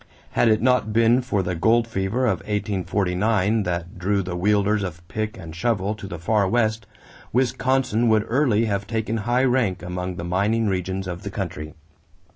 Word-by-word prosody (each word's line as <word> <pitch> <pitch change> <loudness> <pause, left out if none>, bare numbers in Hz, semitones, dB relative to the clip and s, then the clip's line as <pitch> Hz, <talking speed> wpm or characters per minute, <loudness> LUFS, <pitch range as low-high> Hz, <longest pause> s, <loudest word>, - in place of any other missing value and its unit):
Had 120 - +2
it 110 +1 +2
not 125 -4 +2
been 115 +3 +4
for 105 -6 -1
the 90 +1 -2
gold 115 +7 +2
fever 110 +4 -1
of 100 -7 +1
1849 100 +1 0
that 85 -2 -4
drew 100 +2 +1
the 90 -1 -4
wielders 105 +3 +2
of 85 -3 -6
pick 110 +4 -4
and 80 -1 -9
shovel 105 0 0
to 105 -2 -8
the 90 -3 -6
Far 100 +4 +1
West, 110 -2 0 0.4
Wisconsin 125 -1 +1
would 110 -1 +3
early 115 -3 +2
have 100 -1 -2
taken 110 0 -2
high 120 +4 +1
rank 120 -8 +1
among 90 0 -4
the 85 - -6
mining 100 +6 +1
regions 95 -1 -2
of 90 0 -5
the 100 - -5
country. 85 -6 -5
105 Hz, 175 wpm, -23 LUFS, 95-115 Hz, 0.4 s, been